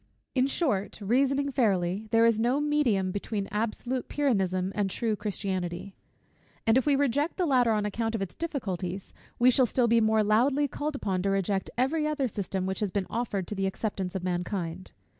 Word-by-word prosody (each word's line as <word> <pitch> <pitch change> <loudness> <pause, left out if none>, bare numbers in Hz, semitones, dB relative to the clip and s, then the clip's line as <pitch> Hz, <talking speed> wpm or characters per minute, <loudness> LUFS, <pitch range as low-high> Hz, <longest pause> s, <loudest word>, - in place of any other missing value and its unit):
In 260 0 +3
short, 260 - 0
reasoning 270 +6 +1
fairly, 200 -5 +1
there 225 +1 +4
is 230 -2 +3
no 245 +5 +2
medium 275 -11 +1
between 200 0 -3
absolute 235 +4 -2
Pyrrhonism 190 -10 0
and 205 -2 0
true 220 +3 -1
Christianity: 190 -3 -4 0.7
and 225 - +4
if 260 +3 +2
we 285 - +5
reject 285 +3 +1
the 365 - +1
latter 250 -6 +3
on 210 -1 +1
account 225 +2 -2
of 215 - -2
its 190 - -7
difficulties, 195 - -4 0.2
we 250 +1 +5
shall 255 0 +4
be - - -8
still 235 -2 +3
more 220 0 +3
loudly 260 +7 +3
called 295 +2 -4
upon 190 -8 -1
to 195 - 0
reject 195 0 0
every 300 +5 +1
other 295 -3 0
system 195 -3 -3
which 190 0 -2
has 210 - 0
been 195 0 -1
offered 215 -5 -2
to 210 - -5
the 195 -1 -1
acceptance 190 -2 -3
of 190 - -3
mankind. 180 -1 -3
220 Hz, 185 wpm, -28 LUFS, 195-260 Hz, 0.7 s, we